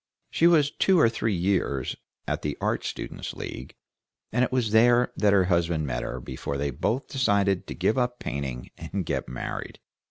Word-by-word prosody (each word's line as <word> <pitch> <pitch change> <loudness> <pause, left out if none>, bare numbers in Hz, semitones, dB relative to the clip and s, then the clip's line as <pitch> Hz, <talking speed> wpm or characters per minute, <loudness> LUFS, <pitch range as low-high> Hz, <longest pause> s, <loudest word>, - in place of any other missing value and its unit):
She 170 - +4
was 150 -4 +4
two 190 -2 +3
or 115 - +6
three 115 -2 -1
years 85 -7 0 0.3
at - - -1
the 75 -1 -3
Art - - 0
Students' - - -5
League, 65 - -7 0.6
and 125 - +2
it 125 - 0
was 125 -4 +1
there 120 +2 +5
that 105 -1 +3
her 100 -2 +5
husband 85 -3 +1
met - - -2
her 65 - -4
before 65 +3 -5
they 70 0 -1
both 120 - -1
decided 100 -7 +1
to - - -6
give 105 +7 +1
up 125 0 0
painting 65 - -5
and 95 -3 -4
get - - -2
married. 60 -1 -5
100 Hz, 185 wpm, -26 LUFS, -, 0.6 s, or